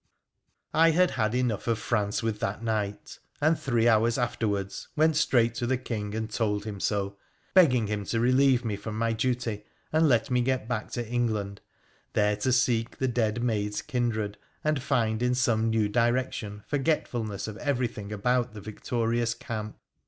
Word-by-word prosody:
I 165 +1 +5
bad 180 +2 +4
had 110 0 0
enough 125 -4 0
of 115 -1 +2
France 105 -1 -1
with 110 -2 -1
that 105 +3 -3
night, 105 -3 -3 0.2
and 155 +2 +3
three 120 -3 +1
hours 115 +1 +3
afterwards 105 -5 -2
went 155 0 +3
straight 120 -6 +3
to 120 - -1
the 130 +1 +1
King 105 -4 -4
and 110 0 -2
told 105 -2 -1
him 105 -2 -5
so, 100 0 -1 0.4
begging 130 - +5
him 105 -1 -3
to 115 - -1
relieve 130 +1 +4
me 105 -3 -1
from 105 +1 -6
my 115 0 +1
duty 115 -3 -1 0.3
and 160 0 +4
let 120 +1 +2
me 125 0 +3
get 130 -2 0
back 115 -3 -3
to 120 -2 -3
England, 110 -4 -1 0.5
there 105 0 +2
to 115 +5 0
seek 120 -2 +1
the 130 - 0
dead 115 -1 0
maid's 105 -3 -1
kindred, 110 -4 -2 0.2
and 150 -3 +1
find 110 -3 0
in 125 0 +2
some 115 -3 +2
new 110 -2 +2
direction 115 -2 -1
forgetfulness 125 -9 -1
of 110 -1 -6
everything 120 -7 -2
about 120 +2 0
tbo 105 - -8
victorious 115 +2 -1
camp. 110 -4 -6
115 Hz, 170 wpm, -27 LUFS, 105-125 Hz, 0.5 s, I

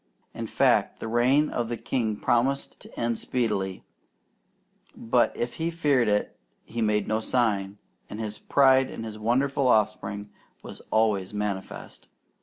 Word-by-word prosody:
In - - -5
fact, - - +2
the - - -5
reign 125 +6 +3
of 120 -1 -2
the 120 - -3
king 110 -4 -1
promised 130 +6 0
to - - -12
end 115 -1 -1
speedily; 100 -6 -2 1.1
but 120 +1 +2
if 120 0 -3
he 165 +1 -1
feared 145 -8 +2
it 105 0 0 0.3
he 115 +1 -5
made 105 -1 +1
no 110 0 +1
sign, 105 -4 0 0.3
and 105 - -7
his 105 -1 -5
pride 135 -1 +4
in - - -7
his 110 -1 -7
wonderful 130 +4 +1
offspring 105 -2 0 0.3
was - - -10
always 105 -3 +1
manifest. 105 -2 -5
115 Hz, 145 wpm, -26 LUFS, 105-125 Hz, 1.1 s, pride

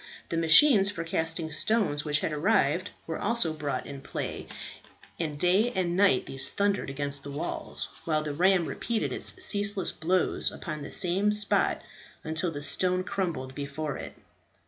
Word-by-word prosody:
The - - -2
machines 195 - +6
for 165 -4 -4
casting 165 0 -2
stones, 175 -4 +1
which 150 -1 0
had 155 - -1
arrived, 165 0 +2 0.2
were 165 - -4
also 205 -7 0
brought 150 -2 -3
in 140 -1 -8
play, - - -5 0.7
and 155 -3 -3
day 190 +8 +3
and 175 -2 0
night 190 -9 +4
these 135 0 0
thundered 200 -5 0
against 140 +1 -1
the 145 - -7
walls; 140 - -3 0.2
while 155 -2 +1
the 150 -1 -3
ram 180 +2 +3
repeated 230 +5 -2
its - - -2
ceaseless 205 - 0
blows 180 +3 0
upon 155 -3 -6
the 145 - -7
same 195 +2 +2
spot, 210 -1 +2 0.4
until 160 +2 -1
the 145 -3 -5
stone 185 +4 +3
crumbled 165 -10 -3
before 145 +1 -4
it. - - -8
165 Hz, 160 wpm, -28 LUFS, 150-195 Hz, 0.7 s, machines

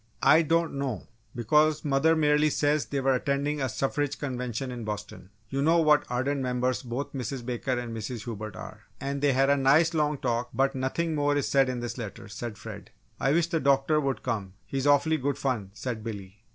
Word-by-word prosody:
"I 150 +4 +7
don't 165 +1 +1
know, 130 -8 -3 0.3
because 150 +6 +2
mother 145 +3 +3
merely 150 -1 +3
says 150 +1 +1
they 140 -1 -2
were 135 0 +3
attending 140 +3 -1
a 130 - 0
suffrage 135 +4 -1
convention 125 -2 -3
in 120 -2 -6
Boston 105 -3 -6 0.2
you 135 +5 -2
know 165 +4 +4
what 155 -3 +4
ardent 135 +3 -1
members 125 0 0
both 125 +3 -5
Mrs. 125 -1 -4
Baker 125 +1 -2
and 120 -2 -4
Mrs. 115 0 -5
Hubert 110 -3 -6
are? - - -9 0.2
And 140 0 -3
they 145 -2 +3
had 135 +2 +3
a 140 - +4
nice 150 +5 +4
long 150 -2 +1
talk, 120 -1 -1
but 135 0 +2
nothing 140 +5 -1
more 145 -1 +1
is 145 - 0
said 135 -2 +3
in 125 -1 -3
this 120 +1 -5
letter," 105 -3 -7
said 110 +1 -6
Fred. - - -9 0.3
"I 135 - +2
wish 170 +1 +3
the 170 -1 -1
doctor 140 +2 +3
would 135 -2 -2
come 105 -7 -3
he's 135 +1 -2
awfully 145 +3 +4
good 140 0 -1
fun!" 120 -8 -2
said 115 -2 -4
Billy. 100 -2 -7
135 Hz, 205 wpm, -27 LUFS, 120-145 Hz, 0.3 s, I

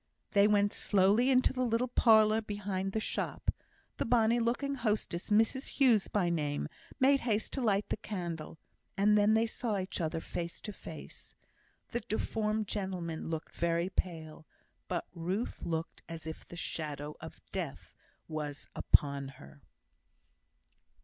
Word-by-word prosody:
They 200 0 +6
went 205 -1 +3
slowly 205 +6 +3
into 255 -1 +4
the 255 - -2
little 235 +1 +1
parlour 220 -3 +5
behind 200 -2 -3
the 220 - +1
shop. - - -2 0.5
The - - -1
bonny 235 0 +4
looking 245 +4 0
hostess, 215 -8 -1
Mrs 225 +6 +3
Hughes 240 -7 +5
by 195 -4 +1
name, 145 -3 -1 0.3
made 275 +1 +5
haste 220 -4 -1
to 270 - -1
light 205 -3 +2
the - - -1
candle, 170 -7 -5 0.4
and 210 +2 +5
then 210 +1 +5
they 225 +1 +4
saw 225 -2 -2
each 185 -1 -3
other, 160 0 -1
face 170 +1 -5
to 210 - -6
face. - - -10 0.5
The 240 - -1
deformed 215 -1 -1
gentleman 180 -6 -3
looked 160 -1 -4
very 170 +1 0
pale, 160 -4 -4 0.4
but - - -2
Ruth 185 +7 -3
looked 165 -1 -3
as 165 -1 -7
if 160 0 -7
the - - -10
shadow 150 -3 -4
of - - -9
death - - -5 0.3
was 150 -2 -4
upon 140 -1 +3
her. 70 +1 -14
205 Hz, 145 wpm, -32 LUFS, 165-225 Hz, 0.5 s, They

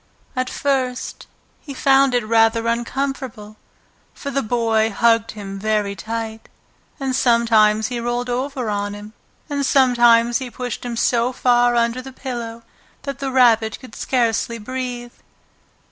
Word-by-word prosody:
At 255 0 -1
first 260 -3 -2 0.3
he 280 -3 -9
found 270 -1 +4
it 240 -3 +1
rather 225 +1 +3
uncomfortable, 235 -2 -3 0.6
for 280 - -6
the 275 +1 0
Boy 225 -2 +1
hugged 230 +1 +2
him 195 -2 -7
very 210 -1 0
tight, 225 +1 -5 0.5
and 265 -2 -1
sometimes 220 -3 +3
he 245 -1 -3
rolled 240 +1 -2
over 255 0 -2
on 205 -1 -2
him, 210 +1 -10 0.3
and 285 -2 -2
sometimes 240 -3 +4
he 260 -2 -5
pushed 245 0 -5
him 240 -1 -4
so 240 +1 +2
far 245 -1 +3
under 235 +1 +1
the 265 +1 -10
pillow 235 -3 -6 0.4
that 275 -1 -5
the 275 - -2
Rabbit 230 -4 +3
could 255 -4 -13
scarcely 235 -2 0
breathe. 245 +1 -5
240 Hz, 140 wpm, -20 LUFS, 225-255 Hz, 0.6 s, found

